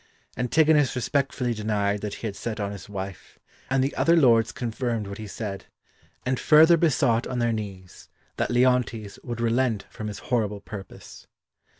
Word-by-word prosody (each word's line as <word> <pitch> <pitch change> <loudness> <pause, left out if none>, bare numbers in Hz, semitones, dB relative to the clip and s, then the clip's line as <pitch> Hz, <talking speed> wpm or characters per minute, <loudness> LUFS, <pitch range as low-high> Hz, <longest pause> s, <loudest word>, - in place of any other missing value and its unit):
] - - -34
Antigonus 150 0 +3
respectfully 125 -1 0
denied 105 -2 -1
that 105 -1 -4
he - - -8
had 105 -3 -3
set 115 +1 -5
on 100 -1 -2
his 100 0 -9
wife, 95 -2 -7 0.3
and 135 0 +2
the 135 - -1
other 170 - +4
lords 115 -8 +4
confirmed 115 -2 -3
what 100 +1 -7
he 110 - -6
said, 100 0 -6 0.6
and 130 0 0
further 160 +2 +7
besought 140 -8 +2
on 125 - -4
their 120 -1 +1
knees 95 -4 -7 0.3
that - - 0
Leontes 120 -4 +1
would 120 -2 -5
relent 115 -2 +1
from 110 - -6
his 105 - -5 0.2
horrible 105 -4 +1
purpose. 100 -1 -10
115 Hz, 170 wpm, -25 LUFS, 105-130 Hz, 0.6 s, further